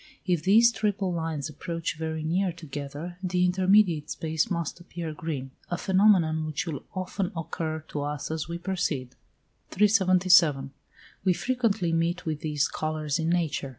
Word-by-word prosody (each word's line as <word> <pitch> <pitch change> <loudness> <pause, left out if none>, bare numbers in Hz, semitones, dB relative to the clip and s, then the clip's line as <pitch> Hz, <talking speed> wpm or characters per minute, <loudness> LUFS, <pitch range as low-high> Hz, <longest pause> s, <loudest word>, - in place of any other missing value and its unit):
If 175 -4 +1
these 225 +7 +6
triple 200 -3 -1
lines 160 -4 -2
approach 165 +2 -4
very 160 0 -3
near 180 +4 +1
together, 155 +1 -7
the 180 -1 +1
intermediate 185 -3 +3
space 160 +6 -1
must 170 -2 -3
appear 170 -2 -6
green; 150 -4 -5 0.2
a 175 - -1
phenomenon 185 -5 +3
which 155 +1 -2
will 155 -5 -4
often 185 0 -2
occur 160 -1 -3
to 145 - -3
us 145 +1 -3
as 160 -1 -3
we 170 0 -4
proceed. 170 -8 -2 0.6
377. 185 -8 +4 0.5
We 185 -1 +4
frequently 220 -6 0
meet 170 +2 0
with 155 -2 -2
these 150 -2 0
colours 155 -1 -2
in 160 0 0
nature. 165 -5 0
170 Hz, 150 wpm, -27 LUFS, 155-185 Hz, 0.6 s, these